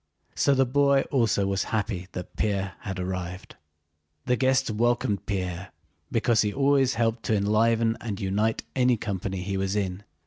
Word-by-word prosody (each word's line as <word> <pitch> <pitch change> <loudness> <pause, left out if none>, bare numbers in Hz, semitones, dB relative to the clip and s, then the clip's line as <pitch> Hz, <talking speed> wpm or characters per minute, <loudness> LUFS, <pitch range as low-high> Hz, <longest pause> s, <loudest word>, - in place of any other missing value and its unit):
So 140 - +3
the 135 0 +4
boy 140 +1 +3
also 115 -7 +2
was 95 -1 0
happy 100 -4 -2
that 90 - -7
Pierre 100 -3 -1
had 95 -2 -5
arrived. 90 0 -5 0.7
The 125 - +2
guests 130 -1 +2
welcomed 115 -2 0
Pierre 90 -2 -3 0.4
because 115 -1 +3
he 105 - 0
always 135 0 +2
helped 115 0 0
to 110 - +2
enliven 115 +2 +2
and 105 -4 -4
unite 105 +3 0
any 125 -2 +3
company 95 -2 -3
he 100 0 -2
was 95 +1 -1
in. 95 -1 -2
105 Hz, 160 wpm, -26 LUFS, 95-120 Hz, 0.7 s, the